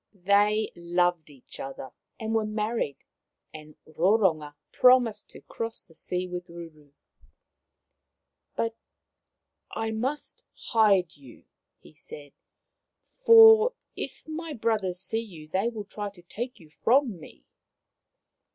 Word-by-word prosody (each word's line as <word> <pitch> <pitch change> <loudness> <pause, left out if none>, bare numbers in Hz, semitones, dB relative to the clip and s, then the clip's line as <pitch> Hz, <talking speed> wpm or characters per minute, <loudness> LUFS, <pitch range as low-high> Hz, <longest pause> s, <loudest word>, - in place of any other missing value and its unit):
They 210 +2 +3
loved 175 -1 0
each 135 -4 -15
other 135 -1 -7 0.3
and 220 -1 -3
were 225 -1 +2
married, 215 -7 -3 0.5
and 155 -1 -12
Roronga 160 -3 +1 0.2
promised 250 -3 +3
to - - -12
cross 230 0 -6
the 165 - -20
sea 180 +3 -4
with 180 0 -6
Ruru. 160 -4 -12 0.8
" - - -56
But 230 0 -1 0.9
I 225 0 -3
must 260 +7 -4 0.3
hide 200 -6 +3
you,'* 135 -5 -17 0.4
he - - -18
said, 145 -1 -12 0.4
" - - -58 0.2
for 450 +1 +8 0.2
if - - -7
my 315 0 -6
brothers 210 -7 -1
see 225 +4 -2
you 170 -9 -12
they 190 +8 0
will 215 -3 -7
try 205 +1 -6
to 190 -3 -19
take 240 +8 -7
you 155 -3 -18
from 240 - +1
me. 65 - -15
200 Hz, 125 wpm, -27 LUFS, 165-225 Hz, 0.9 s, for